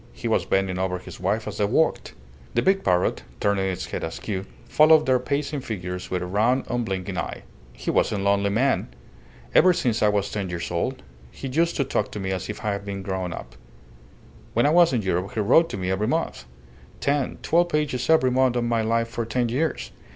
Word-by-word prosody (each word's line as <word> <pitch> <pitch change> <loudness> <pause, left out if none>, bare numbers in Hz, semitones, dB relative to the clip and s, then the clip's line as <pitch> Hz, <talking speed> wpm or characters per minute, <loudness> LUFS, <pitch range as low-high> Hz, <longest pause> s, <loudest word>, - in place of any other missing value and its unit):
He - - -5
was - - +1
bending 95 -1 0
over 95 -1 -1
his 90 - -11
wife 105 +5 -1
as - - -6
they 105 - +3
walked. 140 +10 0 0.4
The 120 - +2
big 195 0 +2
parrot, 90 -1 +1 0.2
turning 100 -1 +1
its 90 - -3
head - - -5
askew, 95 +4 -4 0.2
followed 155 0 +5
their 130 -1 +3
pacing 140 +2 -2
figures 90 -6 -5
with 90 -1 -2
a - - -3
round, 110 +8 +2
unblinking 95 -6 -2
eye. - - -5 0.3
"He - - -4
was - - +2
a - - -1
lonely 100 0 +2
man. 130 +7 +1 0.7
Ever 185 0 +6
since 120 -10 0
I 105 - +5
was 100 -1 0
ten 100 -3 -3
years 85 -1 -4
old - - -2 0.3
he 135 - -7
used 165 +6 +1
to 140 - +1
talk 135 - -1
to 105 - -4
me 95 -1 -3
as 95 +1 -3
if 105 - -6
I 105 - +1
had 100 0 -3
been 100 -1 -5
grown 95 -2 -3
up. - - -8 1.0
When 120 - +3
I 145 - +4
was 170 0 +6
in 120 -5 0
Europe 95 0 -1
he - - -1
wrote 130 +11 +4
to - - -5
me 95 -1 -2
every 100 +3 0
month. 160 - -2 0.5
Ten, 140 -2 0
twelve 175 +2 +3
pages 145 -5 -1
every 145 -6 +4
month 130 -1 +2
of 120 - +1
my 120 -1 +1
life 115 +1 +1
for 115 0 -3
ten 120 +1 -1
years. 150 +7 -1
110 Hz, 215 wpm, -24 LUFS, 95-130 Hz, 1.0 s, Ever